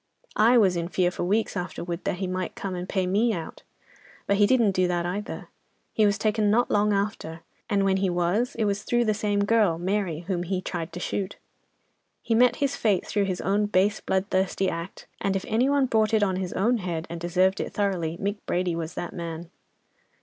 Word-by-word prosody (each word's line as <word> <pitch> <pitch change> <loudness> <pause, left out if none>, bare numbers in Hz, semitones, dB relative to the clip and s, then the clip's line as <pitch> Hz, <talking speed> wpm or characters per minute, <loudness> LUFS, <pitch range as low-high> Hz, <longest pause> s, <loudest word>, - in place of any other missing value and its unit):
"'I 230 +4 +5
was 195 -6 +4
in 170 0 -2
fear 180 0 +1
for 180 - -4
weeks 210 +4 0
afterwards 175 -1 -4
that - - 0
he 190 - -2
might 185 0 -3
come 195 -2 -4
and 180 +1 -5
pay 190 -2 0
me 215 +5 +2
out. 165 -4 -6 0.6
But 200 - +1
he 205 0 +5
didn't 235 -5 +4
do 185 -1 +1
that 175 -1 -1
either. 205 +6 -5 0.4
He 215 -1 +4
was 205 +1 +1
taken 215 0 +1
not 235 +4 +2
long 210 +1 +3
after, 195 -5 -2 0.3
and 200 -2 +2
when 190 0 +2
he 190 -1 +1
was, 180 +7 0
it 220 - 0
was 200 0 0
through 240 +2 +1
that 215 - +2
same 205 -1 0
girl, 210 -6 +3
Mary, 180 -2 -1
whom 180 0 -2
he 180 +1 -2
tried 175 -2 -5
to 175 - -5
shoot. 190 +1 -3 0.9
He 230 - 0
met 245 +2 +5
his 280 -1 -1
fate 205 -5 +1
through 205 -1 0
his 185 -2 -3
own 205 +2 +1
base 205 +1 +2
bloodthirsty 190 0 0
act, 170 +2 -7
and 195 -1 0
if 190 - -2
any 240 +5 +2
one 280 -1 +3
brought 220 -2 +2
it 215 - +3
on 190 -2 +1
his 185 -1 -3
own 235 +6 +2
head, 170 -5 -3
and 170 +1 -6
deserved 185 +2 +2
it - - -3
thoroughly, 180 -5 -1
Mick 200 +1 -2
Brady 175 -1 0
was 165 -1 -5
that 175 - -5
man. 170 0 -6
195 Hz, 215 wpm, -26 LUFS, 180-210 Hz, 0.9 s, I